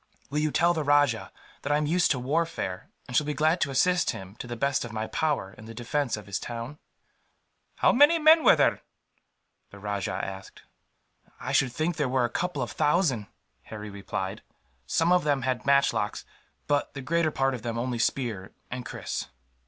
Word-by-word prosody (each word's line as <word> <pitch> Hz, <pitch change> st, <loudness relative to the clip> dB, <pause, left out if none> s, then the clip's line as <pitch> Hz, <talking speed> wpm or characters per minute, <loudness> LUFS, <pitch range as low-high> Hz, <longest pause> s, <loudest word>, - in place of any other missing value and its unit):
"Will 150 Hz, -, 0 dB
you 155 Hz, 0 st, +1 dB
tell 170 Hz, +3 st, +3 dB
the 160 Hz, -2 st, -1 dB
rajah 145 Hz, -5 st, +2 dB, 0.3 s
that 145 Hz, -, -3 dB
I 145 Hz, -, +4 dB
am 150 Hz, -, 0 dB
used 175 Hz, +4 st, +2 dB
to 135 Hz, -, +2 dB
warfare, 135 Hz, -, -2 dB, 0.2 s
and 125 Hz, -, -6 dB
shall 150 Hz, -, +3 dB
be 150 Hz, -, -2 dB
glad 155 Hz, +3 st, +2 dB
to 145 Hz, -, +2 dB
assist 175 Hz, +7 st, +2 dB
him, 95 Hz, +1 st, -6 dB
to 125 Hz, -, -7 dB
the 120 Hz, -, -5 dB
best 140 Hz, +3 st, 0 dB
of 120 Hz, -, -7 dB
my 110 Hz, 0 st, -3 dB
power, 140 Hz, -9 st, -1 dB
in 110 Hz, -, -13 dB
the 115 Hz, 0 st, -10 dB
defence 125 Hz, +1 st, -1 dB
of 105 Hz, -, -9 dB
his 95 Hz, -1 st, -3 dB
town?" 120 Hz, +5 st, -6 dB, 1.0 s
"How -, -, +4 dB
many 290 Hz, +6 st, +6 dB
men 315 Hz, 0 st, +6 dB
were -, -, +7 dB
there?" -, -, +2 dB, 0.9 s
the 100 Hz, -, -13 dB
rajah 100 Hz, -2 st, -3 dB
asked. 95 Hz, 0 st, -9 dB, 0.8 s
"I -, -, -4 dB
should 130 Hz, -2 st, +3 dB
think 155 Hz, +6 st, -1 dB
there 145 Hz, -4 st, 0 dB
were 130 Hz, -1 st, +2 dB
a 120 Hz, -, -4 dB
couple 175 Hz, -7 st, -2 dB
of 115 Hz, -, -5 dB
thousand," 145 Hz, -, +1 dB, 0.4 s
Harry 105 Hz, -1 st, -8 dB
replied. 100 Hz, 0 st, -4 dB, 0.5 s
"Some 165 Hz, +2 st, +2 dB
of 180 Hz, 0 st, +4 dB
them 145 Hz, -3 st, +1 dB
had 130 Hz, +1 st, -2 dB
matchlocks, 140 Hz, -7 st, +2 dB, 0.4 s
but 145 Hz, 0 st, 0 dB
the 135 Hz, -, -5 dB
greater 165 Hz, +3 st, +1 dB
part 135 Hz, -2 st, 0 dB
of 125 Hz, -, -5 dB
them 115 Hz, 0 st, -3 dB
only 120 Hz, 0 st, -2 dB
spear 115 Hz, -7 st, -1 dB, 0.2 s
and 125 Hz, 0 st, -4 dB
kris." -, -, -5 dB
130 Hz, 195 wpm, -27 LUFS, 110-155 Hz, 1.0 s, were